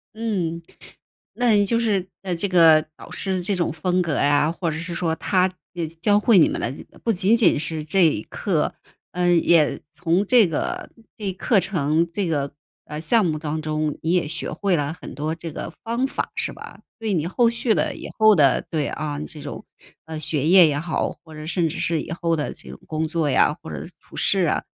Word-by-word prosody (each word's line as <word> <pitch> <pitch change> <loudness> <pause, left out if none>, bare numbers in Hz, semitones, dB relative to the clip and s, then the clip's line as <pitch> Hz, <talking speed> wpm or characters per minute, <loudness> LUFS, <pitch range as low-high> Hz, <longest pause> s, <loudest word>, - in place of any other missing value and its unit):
嗯， 185 -7 -2 0.7
那 245 -1 +2
你 205 -1 +4
就 230 +4 +1
是 200 -5 0
呃， 185 -3 -2
这 200 +4 0
个 165 -4 +6
导 - - -13
师 195 - -2
的 185 - -1
这 195 +3 +1
种 170 -3 -1
风 180 +3 0
格 165 -3 -2
呀， 145 +2 +3
或 170 0 -2
者 155 - -4
是 170 +2 -4
说 165 -2 -1
他， 185 +3 +1 0.2
呃， 170 -2 -3
教 165 +6 0
教 205 - +5
会 210 -1 +4
你 160 - +7
们 - - -3
的 120 - -1
这 - - -10 0.2
不 230 - +2
仅 195 +3 +3
仅 205 -10 +4
是 155 0 -3
这 175 +4 +3
一 145 -10 +2
课， - - -1 0.4
嗯， 175 -1 +2
也 165 -3 +3
从 170 +4 0
这 235 -5 +6
个 160 - -3 0.3
这 210 - -7
一 190 - -1
课 195 +3 +2
程， 165 -3 0
这 195 0 -1
个， 145 -4 -1 0.3
呃， 150 +1 -6
项 220 +5 +4
目 155 -3 -1
当 155 0 -3
中， 155 -1 -2
你 165 - 0
也 180 -4 +2
学 155 0 -3
会 185 +4 0
了 145 -1 -1
很 175 - -10
多 150 +3 -2
这 165 0 -7
个 165 - -6
方 235 +3 -1
法， 270 - -3
是 - - -2
吧？ - - -11 0.2
对 220 -2 -2
你 160 -4 0
后 230 +7 +2
续 235 -1 0
的、 - - 0
以 - - -8
后 215 -1 +7
的 140 -4 +4
对， 155 -4 -1
啊， 150 -1 -4
这 150 0 -8
种， 145 - -8 0.4
啊， 160 -1 -6
学 150 -2 -1
业 175 0 +7
也 145 -2 0
好， 160 +2 -1
或 160 - -13
者 155 0 -8
甚 170 -1 +1
至 175 - -5
是 165 -2 0
以 - - -9
后 170 -1 0
的 150 - -3
这 - - -7
种 - - -10
工 155 0 -2
作 155 -2 0
呀， 150 +3 +3
或 160 - -8
者 - - -5 0.2
处 - - -17
事 195 - +2
啊， 170 - +1
170 Hz, 240 characters per minute, -22 LUFS, 155-190 Hz, 0.7 s, 你